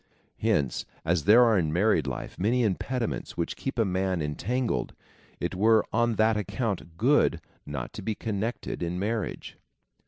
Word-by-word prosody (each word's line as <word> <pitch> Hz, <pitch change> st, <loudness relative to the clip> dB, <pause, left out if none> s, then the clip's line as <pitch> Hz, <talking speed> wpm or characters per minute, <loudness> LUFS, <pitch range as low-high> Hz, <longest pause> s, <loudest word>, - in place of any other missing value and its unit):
Hence, 70 Hz, -4 st, +1 dB, 0.2 s
as 85 Hz, -2 st, +1 dB
there 110 Hz, +5 st, +8 dB
are 110 Hz, -4 st, +4 dB
in 80 Hz, -3 st, 0 dB
married 85 Hz, -3 st, +2 dB
life 65 Hz, -, -5 dB
many 120 Hz, +6 st, +2 dB
impediments 115 Hz, +4 st, -2 dB
which 85 Hz, -, -2 dB
keep 135 Hz, -, -4 dB
a 115 Hz, -, +3 dB
man 95 Hz, -1 st, 0 dB
en 75 Hz, -1 st, -2 dB
tangled, 125 Hz, -, -2 dB, 0.4 s
it -, -, -2 dB
were 110 Hz, +3 st, +4 dB
on 120 Hz, -1 st, +2 dB
that 110 Hz, +1 st, +3 dB
account 100 Hz, -5 st, -3 dB
good 120 Hz, -, +3 dB, 0.3 s
not 70 Hz, -4 st, -5 dB
to -, -, -7 dB
be 110 Hz, +2 st, -2 dB
connected 110 Hz, 0 st, -3 dB
in 85 Hz, +1 st, -2 dB
marriage. 105 Hz, +1 st, -3 dB
100 Hz, 160 wpm, -27 LUFS, 85-115 Hz, 0.4 s, there